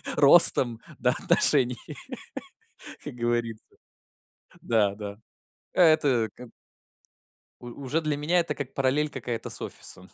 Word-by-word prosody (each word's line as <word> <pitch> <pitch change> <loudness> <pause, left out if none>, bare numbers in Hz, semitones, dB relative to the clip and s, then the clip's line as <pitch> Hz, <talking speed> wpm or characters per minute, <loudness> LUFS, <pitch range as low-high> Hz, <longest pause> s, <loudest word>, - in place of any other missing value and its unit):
ростом, 140 -6 +6 0.2
да, 125 - +1
отношений" 125 -2 +3 1.3
как - - -8
говорится. 120 -2 -4 1.0
Да, 105 -4 -1
да. 100 -1 -9 0.6
Это 145 -9 +2
к 125 0 -13 1.1
У 120 - -11 0.2
уже 160 +6 -2
для 150 -2 -3
меня, 165 +5 0
это 165 -3 -4
как 140 -3 -9
параллель 135 +3 -1
какая-то 125 -4 -7
с - - 0
офисом 95 +1 -7
125 Hz, 115 wpm, -24 LUFS, 115-150 Hz, 1.3 s, ростом